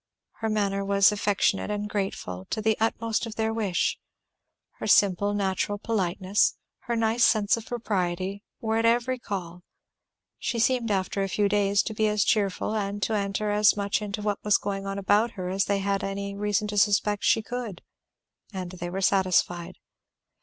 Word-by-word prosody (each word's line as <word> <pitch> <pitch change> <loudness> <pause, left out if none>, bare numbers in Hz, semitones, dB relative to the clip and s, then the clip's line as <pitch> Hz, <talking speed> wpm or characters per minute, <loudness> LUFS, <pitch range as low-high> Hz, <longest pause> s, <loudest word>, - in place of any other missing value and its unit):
Her 225 - -1
manner 200 -2 0
was 200 0 +4
affectionate 205 -1 +1
and 210 0 -2
grateful, 190 - -4
to - - -2
the 220 0 +2
utmost 225 0 0
of 220 - -8
their 220 0 0
wish; 205 -6 0 0.8
her - - -4
simple 200 +1 +4
natural 200 +1 -1
politeness, 195 -2 +1 0.3
her 235 - 0
nice 225 +1 +2
sense 210 -2 +4
of 230 -1 -8
propriety, 195 -4 -2 0.2
were 220 0 -1
at 225 - +1
every 245 +2 +1
call; 180 -6 -6 0.8
she 235 - -2
seemed 235 0 +1
after 195 0 -1
a 195 - -1
few 205 +2 +1
days 200 -1 +2
to 220 - -4
be 215 0 +1
as 210 -1 +2
cheerful 200 0 0
and 200 -1 -2
to 220 - 0
enter 205 0 -1
as 210 0 +4
much 200 +1 0
into 210 0 -4
what 205 -1 -2
was 210 -1 +4
going 195 -1 -4
on 195 0 -3
about 205 +4 +2
her 180 -1 -5
as 195 +2 +1
they 200 - +1
had 195 0 -1
any 200 0 -3
reason 210 +1 0
to 205 - -4
expect 205 0 +2
she 225 - +3
could; 235 -5 -6 0.7
and 185 -3 -5
they 175 -1 -6
were 190 +2 -4
satisfied. 185 -3 +1
205 Hz, 175 wpm, -26 LUFS, 195-215 Hz, 0.8 s, was